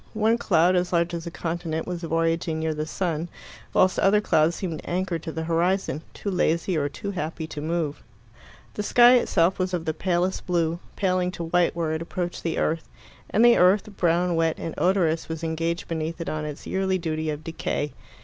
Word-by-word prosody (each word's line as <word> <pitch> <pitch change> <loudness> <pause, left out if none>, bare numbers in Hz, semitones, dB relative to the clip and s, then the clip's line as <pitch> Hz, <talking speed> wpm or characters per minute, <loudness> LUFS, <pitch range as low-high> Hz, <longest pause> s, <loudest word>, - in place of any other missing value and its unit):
One 220 +2 +2
cloud, 180 -2 +3
as 180 0 +1
large 170 0 +1
as 170 0 -4
a - - -2
continent, 165 -1 -3
was 180 -1 -4
voyaging 165 -1 0
near 160 0 -1
the 155 0 -3
sun, 170 -1 -2 0.4
whilst 185 0 +3
other 200 +2 +4
clouds 165 -5 +2
seemed 165 -5 -4
anchored 180 -2 -2
to 160 - -5
the 160 0 -4
horizon, 170 -1 0
too 200 - -3
lazy 170 0 +1
or 145 -2 0
too 200 +8 -5
happy 165 -3 -4
to 155 -2 -7
move. 160 -2 -2 0.7
The - - -3
sky 240 +4 +6
itself 180 -6 +2
was 185 0 0
of 170 -2 -4
the 160 - 0
palest 180 +2 -1
blue, 170 -1 +1 0.2
paling 185 -2 +1
to 170 - -5
white 170 +1 +2
where 165 -2 -1
it 160 +1 -2
approached 175 +1 -4
the 165 - -2
earth; 160 +1 -1 0.4
and 220 +3 +4
the 240 0 +7
earth, 200 +3 +3
brown, 175 0 +2
wet, 165 -1 +1
and 165 - -5
odorous, 175 -4 +1
was 160 0 -5
engaged 165 +1 -2
beneath 165 0 -3
it 170 - -3
on 155 0 -3
its 150 -1 -7
yearly 190 0 0
duty 160 -2 -2
of 150 0 -4
decay. 150 -3 -3
170 Hz, 195 wpm, -25 LUFS, 160-185 Hz, 0.7 s, the